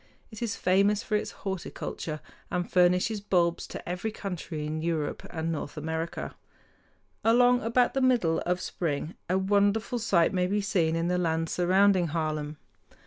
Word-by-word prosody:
It 220 - -10
is 230 -3 -1
famous 200 +3 +2
for 215 - -1
its 210 - -1 0.2
horticulture, 170 -4 -4 0.3
and 180 -2 -1
furnishes 180 +4 +3
bulbs 175 -4 +1
to - - -8
every 180 +5 -2
country 180 -7 -5
in 155 +1 -3
Europe 160 -3 -2
and 165 0 -3
North 155 -1 -5
America. 160 +2 -4 0.9
Along 245 +2 +5
about 240 +2 +2
the 270 - 0
middle 240 -11 +3
of 180 +1 -1
spring 160 -2 -3 0.2
a 185 - +2
wonderful 205 +4 +1
sight 190 -7 +3
may 180 -1 +1
be 205 +3 0
seen 180 -6 +1
in 165 +1 0
the 180 0 +1
lands 165 -2 0
surrounding 185 0 +3
Haarlem. 155 -1 -2
180 Hz, 155 wpm, -28 LUFS, 165-205 Hz, 0.9 s, Along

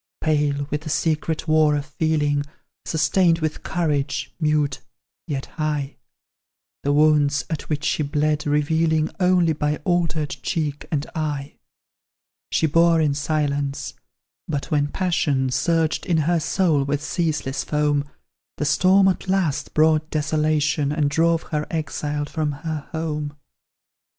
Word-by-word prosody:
Pale 145 -2 +1
with 150 - -1
the 155 - -7
secret 155 +1 -1
war 155 -1 +4
of 145 -1 -2
feeling, 150 -1 0 0.4
Sustained 165 +2 +2
with 155 -2 -3
courage, 150 -6 -1
mute, 150 -3 +1 0.5
yet 140 -4 -3 0.2
high; 150 -2 -1 0.9
The 145 - 0
wounds 145 -1 +3
at 160 - -4
which 150 -2 -1
she - - +1
bled, 150 +1 0
revealing 155 +2 +1
Only 180 -3 +3
by 150 0 0
altered 165 -4 0
cheek 150 -4 -2
and 150 -2 0
eye; 150 -3 -4 0.9
She - - +2
bore 165 +2 +4
in 150 -3 +2
silence 145 -1 -1 0.5
but 145 -3 -3
when 145 -1 +2
passion 145 -6 0
Surged 160 +6 0
in 170 -3 +2
her 170 +1 +2
soul 160 -4 +1
with 145 +1 -2
ceaseless 155 -5 -1
foam, 150 -1 +1 0.5
The 150 - -1
storm 185 +6 +4
at 190 0 0
last 185 -7 0
brought 155 0 +3
desolation, 150 -1 +1
And 150 -2 0
drove 165 +2 +2
her 150 0 -1
exiled 150 -2 -3
from 155 -1 -2
her 155 0 -5
home. 150 -2 -3
150 Hz, 130 wpm, -22 LUFS, 145-160 Hz, 0.9 s, war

